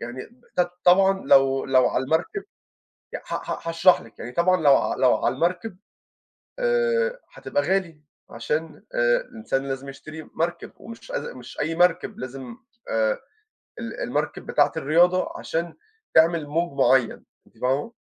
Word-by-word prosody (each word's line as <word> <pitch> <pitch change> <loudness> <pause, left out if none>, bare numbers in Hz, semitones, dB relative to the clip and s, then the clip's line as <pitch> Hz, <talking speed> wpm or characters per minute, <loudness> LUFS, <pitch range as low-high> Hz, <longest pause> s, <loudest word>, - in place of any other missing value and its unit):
يعني 120 +2 -7
ب 240 +1 -26 0.2
ط 175 - -5
طبعًا 190 +2 +5
لو 135 -1 +4
لو 130 -1 +4
على 130 - -1
المركب 165 - -1 0.7
ي - - -2
ها - - -4
هاشرح 165 +2 +4
لِك، 115 - -17
يعني 120 - -7
طبعًا 180 +3 +2
لو 140 -2 +6
ع - - -1
لو 130 -2 +4
على - - 0
المركب 180 +6 -1 0.8
آآ 485 0 +1
هتبقى 290 - -2
غالي 180 -5 -1 0.3
عشان 155 +7 -4
آآ - - +3
الإنسان 140 - -3
لازم 135 +1 -5
يشتري 155 +3 -9
مركب 170 +1 -3
ومش 230 - -11
أز - - -3
مش - - -10
أي 165 - -1
مركب، 180 +4 +2
لازم 130 -2 -7 0.3
آآ 110 -1 +1 0.6
ال - - -6
المركب - - -3
بتاعة - - +2
الرياضة 175 +5 +2
عشان 170 +1 -3 0.4
تعمل 160 -1 +4
موج 160 -1 -2
معيّن، 130 -3 +3 0.2
أنتِ - - -25
فاهمة؟ 135 - -1
165 Hz, 150 wpm, -24 LUFS, 135-195 Hz, 0.8 s, لو